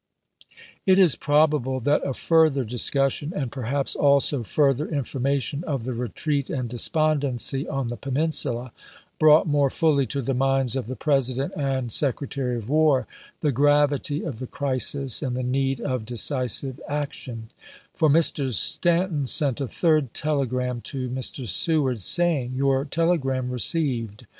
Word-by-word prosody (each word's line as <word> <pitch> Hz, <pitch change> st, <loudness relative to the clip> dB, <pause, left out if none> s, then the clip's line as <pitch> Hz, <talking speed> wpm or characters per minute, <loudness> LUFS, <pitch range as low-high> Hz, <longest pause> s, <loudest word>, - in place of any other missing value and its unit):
It 190 Hz, 0 st, +5 dB
is 180 Hz, -7 st, +6 dB
probable 145 Hz, -3 st, +1 dB
that 145 Hz, +5 st, +1 dB
a 135 Hz, -, -3 dB
further 160 Hz, -5 st, +2 dB
discussion, 135 Hz, +6 st, 0 dB
and 130 Hz, -5 st, -3 dB
per 130 Hz, -4 st, -6 dB
haps 140 Hz, 0 st, 0 dB
also 140 Hz, -1 st, +3 dB
fm'ther 140 Hz, +5 st, 0 dB
information 140 Hz, +1 st, -2 dB
of 140 Hz, -6 st, -3 dB
the 130 Hz, +1 st, -4 dB
retreat 140 Hz, +4 st, -3 dB
and 125 Hz, -2 st, -3 dB
de 120 Hz, +1 st, -7 dB
spondency 140 Hz, -2 st, +1 dB
on 135 Hz, -4 st, -3 dB
the 120 Hz, -, -5 dB
Peninsula, 135 Hz, -4 st, -1 dB, 0.5 s
brought 155 Hz, 0 st, +5 dB
more 145 Hz, -2 st, +1 dB
fully 140 Hz, -3 st, +1 dB
to 140 Hz, +4 st, -2 dB
the 135 Hz, -, -1 dB
minds 135 Hz, -1 st, 0 dB
of 130 Hz, -5 st, -3 dB
the 130 Hz, -, -5 dB
President 135 Hz, -2 st, -1 dB
and 135 Hz, -4 st, -2 dB
Secretary 135 Hz, -1 st, -1 dB
of 110 Hz, -2 st, -8 dB
War 150 Hz, -2 st, +2 dB, 0.4 s
the 150 Hz, -, +1 dB
gravity 145 Hz, +2 st, +1 dB
of 135 Hz, -9 st, -6 dB
the 130 Hz, -, -6 dB
crisis 135 Hz, -2 st, -1 dB
and 130 Hz, -4 st, -3 dB
the 130 Hz, -, -3 dB
need 135 Hz, +1 st, -1 dB
of 130 Hz, -4 st, -3 dB
decisive 130 Hz, +2 st, 0 dB
action; 130 Hz, -6 st, -5 dB, 0.4 s
for 155 Hz, -, +1 dB
Mr. 145 Hz, -3 st, +2 dB
Stanton 170 Hz, -, +1 dB
sent 140 Hz, -1 st, +1 dB
a 135 Hz, -, -2 dB
third 155 Hz, -3 st, 0 dB
telegram 125 Hz, -5 st, -2 dB
to 130 Hz, -1 st, -4 dB
Mr. 130 Hz, 0 st, -3 dB
Seward 130 Hz, -, +2 dB
saying: 145 Hz, -, +2 dB
" -, -, -6 dB
Your 135 Hz, 0 st, +1 dB
telegram 140 Hz, -6 st, -1 dB
received. 125 Hz, -5 st, 0 dB
135 Hz, 150 wpm, -23 LUFS, 125-150 Hz, 0.5 s, is